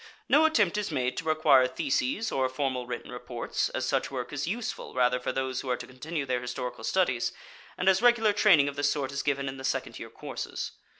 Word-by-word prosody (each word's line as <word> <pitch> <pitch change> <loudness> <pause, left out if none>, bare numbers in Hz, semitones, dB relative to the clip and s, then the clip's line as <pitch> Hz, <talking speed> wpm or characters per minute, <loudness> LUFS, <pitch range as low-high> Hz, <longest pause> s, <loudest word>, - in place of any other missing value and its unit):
No 305 +3 +5
attempt 210 - +3
is 210 - -2
made 130 -4 -1
to 165 - -4
require 155 -5 +5
theses 135 - -1
or 130 -1 +1
formal 130 -2 -2
written 125 -1 -6
reports, 125 -1 -3
as - - -2
such - - 0
work 125 -1 -5
is 145 +1 -2
useful 220 - -4
rather 125 0 +3
for 125 - -2
those 130 0 -2
who 130 - -6
are 125 - +1
to - - -8
continue 145 +4 -5
their 125 -2 -1
historical 125 -1 -5
studies, 130 -7 +1 0.5
and 180 - -2
as 190 +1 +5
regular 235 -3 +4
training 175 -9 +5
of 140 - -3
this 145 0 +1
sort 140 -3 -2
is 140 0 -2
given 140 -1 -1
in 135 0 -5
the 135 - -9
second - - -2
year - - -7
courses. - - -5
135 Hz, 220 wpm, -28 LUFS, 125-165 Hz, 0.5 s, No